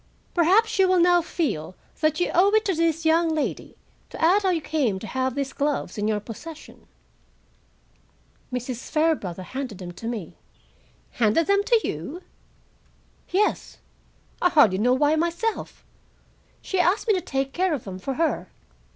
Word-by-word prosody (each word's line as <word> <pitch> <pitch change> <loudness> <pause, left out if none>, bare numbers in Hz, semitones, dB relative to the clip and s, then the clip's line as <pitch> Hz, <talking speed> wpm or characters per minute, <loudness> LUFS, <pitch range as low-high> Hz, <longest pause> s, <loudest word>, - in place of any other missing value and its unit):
"Perhaps 390 +6 +3
you 380 - +6
will 370 -1 +3
now 350 0 +5
feel 220 - -3 0.2
that 310 0 +1
you 355 - 0
owe 370 +4 +5
it 435 0 +3
to 390 - +1
this 330 -1 0
young 330 +1 +3
lady 310 -2 -3 0.3
to - - -10
add 360 +6 +4
how 385 - +1
you 350 -3 +1
came 280 -10 -1
to 190 - -8
have 260 +1 -2
these 275 -1 -3
gloves 290 0 -2
in 210 0 -1
your 215 -1 0
possession?" 290 +9 -11 1.6
"Mrs. 250 -1 -5
Fairbrother 305 - 0
handed 260 -1 -6
them 180 -2 -7
to 225 +6 -8
me." 210 -8 -5 0.7
"Handed 235 +8 +2
them 400 0 +2
to 460 -2 +2
you?" 270 - -6 1.1
"Yes, 405 +4 0 0.6
I 360 - +4
hardly 230 - +4
know 245 +4 +3
why 295 +3 +3
myself. 340 +7 -2 0.8
She 380 - -2
asked 360 +6 +2
me 430 - +4
to 370 - 0
take 270 -2 -3
care 365 -2 +1
of 260 - -7
them 185 -2 -7
for 265 +7 -4
her. 325 +2 -1
310 Hz, 160 wpm, -24 LUFS, 240-355 Hz, 1.6 s, you